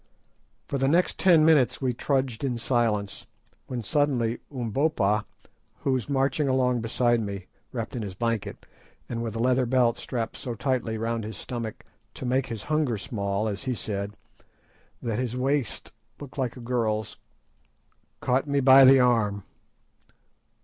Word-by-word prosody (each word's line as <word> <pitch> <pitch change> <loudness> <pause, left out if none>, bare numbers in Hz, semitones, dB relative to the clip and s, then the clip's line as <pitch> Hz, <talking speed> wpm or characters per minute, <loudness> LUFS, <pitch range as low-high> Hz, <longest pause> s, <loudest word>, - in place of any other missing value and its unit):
For 140 - -2
the 135 - +2
next 170 +5 +2
ten 170 -5 +6
minutes 150 -7 +4
we 130 -2 0
trudged 130 -2 -1
in 125 -3 -1
silence, 115 -5 -1 0.4
when 125 -2 -4
suddenly 125 -3 +1
Umbopa, 115 -4 0 0.6
who 135 - 0
was 130 0 -1
marching 140 +2 +1
along 125 -2 +2
beside 120 +1 +1
me, 100 -3 -5 0.3
wrapped 115 -1 -4
in 120 - -3
his 100 -3 -6
blanket, 115 0 -2 0.4
and 115 -1 -3
with 115 -2 -4
a - - -3
leather 125 +1 +2
belt 120 -2 +2
strapped 115 -3 -4
so 120 -2 -5
tightly 120 -2 -1
round 115 0 -2
his 105 -2 -6
stomach, 115 -1 -6 0.3
to - - -6
"make 130 +1 +1
his 110 -3 -6
hunger 150 -7 0
small," 100 +1 -2
as 100 +3 -4
he 130 -2 -1
said, 100 -1 -4 0.9
that 115 -2 -1
his 125 -1 -2
waist 135 -2 -1 0.3
looked 145 -3 -10
like 130 -1 -2
a - - -9
girl's, 115 -3 -1 1.0
caught 130 +3 +1
me 140 0 +1
by 135 0 +8
the 135 +1 +8
arm. 110 -5 +2
120 Hz, 155 wpm, -26 LUFS, 110-130 Hz, 1.0 s, by